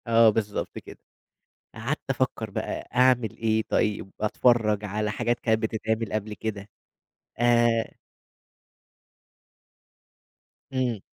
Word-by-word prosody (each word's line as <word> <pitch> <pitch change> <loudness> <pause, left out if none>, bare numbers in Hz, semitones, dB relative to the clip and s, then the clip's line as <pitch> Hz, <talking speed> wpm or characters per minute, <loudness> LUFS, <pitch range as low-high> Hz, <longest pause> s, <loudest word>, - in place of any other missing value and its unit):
آه، 115 -1 +6
بالضبط 105 -1 -2
كده، - - -10 0.8
قعدت - - -2
أفكر - - -1
بقى - - -4
أعمل 125 -3 +3
إيه 110 -1 +1
طيب؟ 105 -2 0
أتفرّج 110 -1 +2
على 105 +1 -2
حاجات 120 +2 -1
كانت 110 -1 +1
بتتعمل 110 0 -1
قبل 110 0 -2
كده 105 0 -5 0.7
آآ 120 -1 +3 2.8
إمم. 125 -4 0
110 Hz, 95 wpm, -26 LUFS, 105-120 Hz, 2.8 s, آه